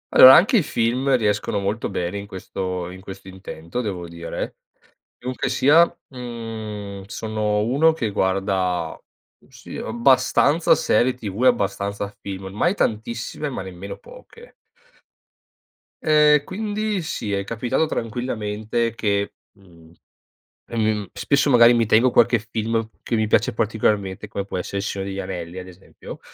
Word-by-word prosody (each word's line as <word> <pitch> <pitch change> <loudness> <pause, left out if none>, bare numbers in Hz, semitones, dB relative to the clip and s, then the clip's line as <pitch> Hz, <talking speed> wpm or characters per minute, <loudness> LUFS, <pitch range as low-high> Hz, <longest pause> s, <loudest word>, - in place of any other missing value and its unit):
Allora 130 +1 +11
anche 225 +8 +5
i - - +4
film 130 +2 +1
riescono 105 -2 0
molto 100 +4 -2
bene 90 +1 -3
in 100 - -8
questo 90 -2 -5
in 95 +1 -11
questo 95 0 -10
intento 95 +3 -6
devo 95 -6 -4
dire. 85 0 -6 0.6
Comunque 125 +1 -3
sia, 155 +5 +5 0.3
mhmm, 110 -5 -7
sono 105 0 -2
uno 140 +9 +3
che 115 -9 -2
guarda, 95 -3 0 0.5
sì, - - -11
abbastanza 130 +6 +3
serie 125 +4 +2
TV 110 -1 -5
e - - +6
abbastanza 100 -3 0
film, 95 -1 -6
mai 175 - +1
tantissime, 115 - -2
ma 130 - -5
nemmeno 95 +1 -8
poche. - - -15 1.5
Ehm, 150 -1 +5
quindi 210 +1 -2
sì, 110 -9 -4
è 100 0 -1
capitato, 120 +7 0
tranquillamente 115 -3 -2
che, 100 -3 -1 0.2
mhmm, 85 -5 -19 0.8
ehm, 115 - -4 0.2
m 100 - -10
spesso 140 0 +1
magari 120 -2 +7
mi 115 -1 +2
tengo 115 +4 +4
qualche 120 0 +4
film 115 0 -2
che 120 - -1
mi 110 0 +1
piace 105 +1 +2
particolarmente 105 -2 -1
come 100 -2 -4
può 100 - -5
essere 90 +2 -4
Il 100 - -2
Signore 100 -1 -3
degli 95 - -5
Anelli 90 -1 -5
ad 90 - -9
esempio 90 +1 -12
110 Hz, 140 wpm, -22 LUFS, 100-125 Hz, 1.5 s, Allora